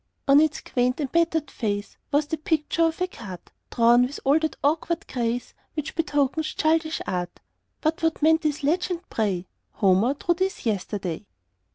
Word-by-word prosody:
On 275 Hz, +1 st, +7 dB
its 315 Hz, 0 st, +2 dB
quaint 250 Hz, +1 st, 0 dB
and 280 Hz, -3 st, -2 dB
battered 325 Hz, -3 st, +1 dB
face 205 Hz, -3 st, -3 dB, 0.2 s
Was 290 Hz, +1 st, +3 dB
the 320 Hz, +2 st, -3 dB
picture 310 Hz, +2 st, +1 dB
of 325 Hz, +1 st, -1 dB
a -, -, +4 dB
cart, 205 Hz, -, -10 dB, 0.2 s
Drawn 235 Hz, +1 st, +5 dB
with 250 Hz, +3 st, -1 dB
all 280 Hz, +3 st, +4 dB
that 315 Hz, -1 st, -2 dB
awkward 315 Hz, +3 st, 0 dB
grace 240 Hz, -1 st, -2 dB, 0.2 s
Which 305 Hz, 0 st, -3 dB
betokens 305 Hz, -1 st, 0 dB
childish 315 Hz, 0 st, +1 dB
art; 180 Hz, -1 st, -3 dB, 0.4 s
But 315 Hz, +1 st, 0 dB
what 325 Hz, -1 st, +1 dB
meant 320 Hz, +1 st, +4 dB
this 305 Hz, -2 st, -1 dB
legend, 350 Hz, +3 st, 0 dB
pray: 195 Hz, -5 st, -1 dB, 0.3 s
"Homer 200 Hz, +7 st, +3 dB
drew 345 Hz, +4 st, +1 dB
this 380 Hz, 0 st, -2 dB
yesterday?" 200 Hz, -3 st, -2 dB
290 Hz, 165 wpm, -25 LUFS, 235-320 Hz, 0.4 s, On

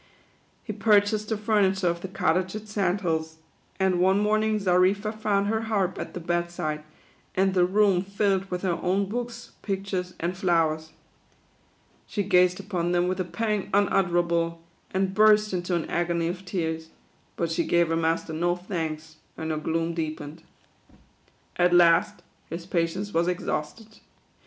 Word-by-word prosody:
He 215 Hz, -, -5 dB
purchased 210 Hz, 0 st, +2 dB
the 220 Hz, -, 0 dB
furniture 200 Hz, -3 st, +2 dB
of 170 Hz, 0 st, -1 dB
the 190 Hz, -, -5 dB
Cottage 185 Hz, 0 st, 0 dB
at 215 Hz, 0 st, -7 dB
Sand 200 Hz, -2 st, 0 dB
Hills, 160 Hz, -2 st, -2 dB, 0.4 s
and 190 Hz, -2 st, +2 dB
one 190 Hz, +2 st, +4 dB
morning 215 Hz, +1 st, +2 dB
Xarifa 195 Hz, +2 st, +2 dB
found 205 Hz, -2 st, 0 dB
her 220 Hz, +2 st, 0 dB
harp 195 Hz, -4 st, 0 dB
at -, -, -6 dB
the -, -, -3 dB
bed 175 Hz, 0 st, -1 dB
side, 155 Hz, -3 st, -4 dB, 0.5 s
and 190 Hz, 0 st, +2 dB
the 180 Hz, -1 st, +3 dB
room 195 Hz, -1 st, +3 dB
filled 195 Hz, 0 st, 0 dB
with 180 Hz, 0 st, -4 dB
her 175 Hz, -3 st, 0 dB
own 195 Hz, +3 st, +1 dB
books, 240 Hz, +3 st, -5 dB
pictures, 190 Hz, -2 st, -3 dB
and 175 Hz, +2 st, -2 dB
flowers. 165 Hz, -4 st, +1 dB, 1.2 s
She 205 Hz, -, -2 dB
gazed 180 Hz, -1 st, +3 dB
upon 180 Hz, -3 st, -2 dB
them 175 Hz, 0 st, +2 dB
with 185 Hz, +1 st, -2 dB
a -, -, +1 dB
pang 210 Hz, +2 st, -2 dB
un 200 Hz, 0 st, +4 dB
utterable, 170 Hz, -2 st, +1 dB, 0.3 s
and 190 Hz, 0 st, -1 dB
burst 210 Hz, 0 st, +5 dB
into 175 Hz, 0 st, -1 dB
an 170 Hz, -, -2 dB
agony 170 Hz, -1 st, 0 dB
of 180 Hz, +2 st, -5 dB
tears; 160 Hz, -3 st, -3 dB, 0.5 s
but 170 Hz, -1 st, -2 dB
she 165 Hz, -, +1 dB
gave 170 Hz, -1 st, +2 dB
her 165 Hz, -, +1 dB
master 165 Hz, 0 st, 0 dB
no 175 Hz, +2 st, +1 dB
thanks, 160 Hz, -4 st, -5 dB, 0.2 s
and 160 Hz, 0 st, -3 dB
her 155 Hz, -, -1 dB
gloom 165 Hz, +2 st, -1 dB
deepened. 155 Hz, -1 st, -5 dB, 1.2 s
At 175 Hz, 0 st, +4 dB
last 170 Hz, -1 st, +4 dB, 0.3 s
his 170 Hz, +1 st, -6 dB
patience 180 Hz, +3 st, -2 dB
was 170 Hz, +1 st, +2 dB
exhausted. 180 Hz, +5 st, -4 dB
180 Hz, 160 wpm, -26 LUFS, 170-200 Hz, 1.2 s, burst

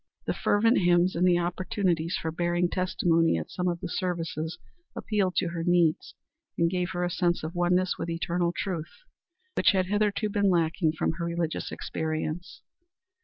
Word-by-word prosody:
The -, -, 0 dB
fervent 225 Hz, +5 st, +3 dB
hymns 175 Hz, 0 st, +3 dB
and 180 Hz, +2 st, +3 dB
the 175 Hz, -1 st, +4 dB
opportunities 175 Hz, -1 st, -1 dB
for 160 Hz, -, -3 dB
bearing 175 Hz, +1 st, 0 dB
testimony 170 Hz, -, +2 dB
at 80 Hz, -, -5 dB
some 180 Hz, 0 st, -2 dB
of 175 Hz, -1 st, -1 dB
the -, -, -3 dB
services 165 Hz, -3 st, -3 dB, 0.4 s
appealed 200 Hz, -4 st, -1 dB
to 180 Hz, -, +1 dB
her 170 Hz, -1 st, -4 dB
needs 175 Hz, -2 st, +2 dB, 0.4 s
and 170 Hz, 0 st, +2 dB
gave 180 Hz, -1 st, -1 dB
her 175 Hz, 0 st, -1 dB
a 175 Hz, -, 0 dB
sense 175 Hz, -2 st, 0 dB
of 160 Hz, +2 st, -4 dB
oneness 180 Hz, +1 st, +1 dB
with 170 Hz, -, -3 dB
eternal 170 Hz, +1 st, 0 dB
truth, 175 Hz, -, -5 dB, 0.5 s
which -, -, +4 dB
had 185 Hz, -1 st, +2 dB
hitherto 210 Hz, +2 st, 0 dB
been 200 Hz, -1 st, +2 dB
lacking 165 Hz, -2 st, +2 dB
from 155 Hz, -, 0 dB
her 170 Hz, -, -1 dB
religious 170 Hz, -1 st, -2 dB
experience. 160 Hz, +2 st, -4 dB
175 Hz, 170 wpm, -27 LUFS, 165-185 Hz, 0.5 s, the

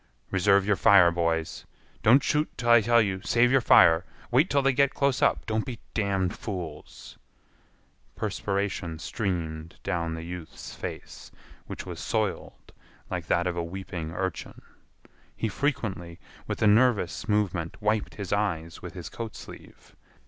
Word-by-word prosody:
"Reserve 100 Hz, +1 st, +3 dB
your 105 Hz, 0 st, +2 dB
fire, 95 Hz, -4 st, +6 dB
boys—don't 85 Hz, -, 0 dB
shoot 150 Hz, 0 st, +1 dB
till 120 Hz, -1 st, +1 dB
I 120 Hz, -1 st, +8 dB
tell 120 Hz, +1 st, +4 dB
you—save 105 Hz, +5 st, +1 dB
your 135 Hz, 0 st, +4 dB
fire—wait 115 Hz, -, +4 dB
till 140 Hz, -1 st, +2 dB
they 135 Hz, 0 st, +3 dB
get 140 Hz, +1 st, +2 dB
close 140 Hz, -2 st, +1 dB
up—don't 110 Hz, -1 st, +1 dB
be 125 Hz, -3 st, -6 dB, 0.2 s
damned 100 Hz, -3 st, 0 dB
fools—" 85 Hz, -8 st, -8 dB, 1.0 s
Perspiration 100 Hz, -5 st, -2 dB
streamed 85 Hz, -3 st, -4 dB
down 85 Hz, -1 st, -2 dB
the 80 Hz, -, -7 dB
youth's 85 Hz, -1 st, -8 dB
face, -, -, -8 dB, 0.4 s
which -, -, -7 dB
was -, -, -7 dB
soiled -, -, -3 dB, 0.4 s
like -, -, -4 dB
that 85 Hz, -, +1 dB
of 90 Hz, -1 st, -1 dB
a 85 Hz, -, -2 dB
weeping 85 Hz, -2 st, -6 dB
urchin. 95 Hz, -1 st, -5 dB, 0.7 s
He 115 Hz, -, -1 dB
frequently, 95 Hz, -, -3 dB, 0.3 s
with -, -, -3 dB
a -, -, +5 dB
nervous 110 Hz, -4 st, +2 dB
movement, 95 Hz, -6 st, -1 dB
wiped 105 Hz, 0 st, -1 dB
his 100 Hz, -3 st, -4 dB
eyes 85 Hz, -6 st, -2 dB
with -, -, -9 dB
his -, -, -7 dB
coat 115 Hz, -2 st, -7 dB
sleeve. -, -, -13 dB
100 Hz, 140 wpm, -27 LUFS, 85-115 Hz, 1.0 s, I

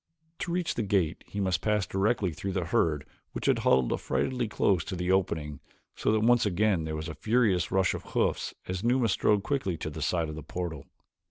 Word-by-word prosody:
To 170 Hz, -, -3 dB
reach 175 Hz, -1 st, 0 dB
the -, -, -2 dB
gate 95 Hz, -5 st, 0 dB
he 100 Hz, -, -6 dB
must 95 Hz, -2 st, +1 dB
pass 105 Hz, -2 st, +1 dB
directly 100 Hz, -1 st, +1 dB
through 95 Hz, +4 st, -4 dB
the 90 Hz, -3 st, -1 dB
herd 80 Hz, -4 st, +1 dB, 0.3 s
which -, -, -5 dB
had -, -, +3 dB
huddled 65 Hz, -2 st, +3 dB
affrightedly 125 Hz, -3 st, -1 dB
close 100 Hz, -3 st, +1 dB
to 95 Hz, -, -4 dB
the 90 Hz, +1 st, -1 dB
opening 80 Hz, -6 st, 0 dB, 0.4 s
so -, -, +1 dB
that 110 Hz, 0 st, +2 dB
once 120 Hz, +1 st, +4 dB
again 100 Hz, -3 st, +1 dB
there 80 Hz, 0 st, -3 dB
was 80 Hz, +1 st, -4 dB
a 80 Hz, -, -5 dB
furious 105 Hz, -4 st, +2 dB
rush 95 Hz, -1 st, +2 dB
of -, -, -4 dB
hoofs -, -, -1 dB
as 90 Hz, +2 st, -3 dB
Numa 120 Hz, -1 st, +2 dB
strode 100 Hz, 0 st, +2 dB
quickly 115 Hz, -, -1 dB
to 75 Hz, -, -5 dB
the 80 Hz, +1 st, -7 dB
side 85 Hz, +2 st, 0 dB
of 75 Hz, -, -6 dB
the 80 Hz, -, -6 dB
portal. 80 Hz, -1 st, -5 dB
95 Hz, 210 wpm, -28 LUFS, 80-110 Hz, 0.4 s, once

